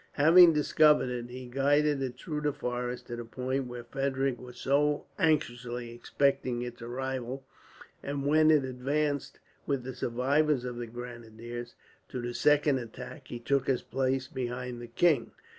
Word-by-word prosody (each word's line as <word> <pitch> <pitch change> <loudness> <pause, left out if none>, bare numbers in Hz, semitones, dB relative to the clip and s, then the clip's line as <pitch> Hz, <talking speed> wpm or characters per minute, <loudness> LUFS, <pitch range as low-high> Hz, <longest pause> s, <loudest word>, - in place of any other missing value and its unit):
Having 165 +3 +8
discovered 150 -2 +4
it, 120 -1 -4
he 125 +1 -8
guided 140 +3 +2
it 130 -2 -3
through 150 -3 -4
the 150 -1 0
forest 125 -3 -4
to 120 - -6
the 120 - -5
point 130 +3 -3
where 120 -1 -7
Frederick 135 0 -1
was 125 -1 -11
so 145 +2 +1
anxiously 125 -7 0
expecting 130 0 0
its 120 -1 -7
arrival; 130 +1 -4 0.6
and 140 0 -3
when 155 +2 +5
it 150 -4 +5
advanced, 140 +3 -1 0.3
with 140 -3 0
the 130 +1 -5
survivors 130 +3 +1
of 125 -1 -5
the 120 -1 -5
grenadiers, 120 0 -8 0.3
to 130 - -4
the 120 0 -4
second 145 0 +3
attack, 125 +3 -9
he 120 - -6
took 135 +3 0
his 130 -3 +1
place 130 0 -1
behind 125 -1 -4
the 120 - -7
king. 140 +1 +2
130 Hz, 160 wpm, -30 LUFS, 120-145 Hz, 0.6 s, Having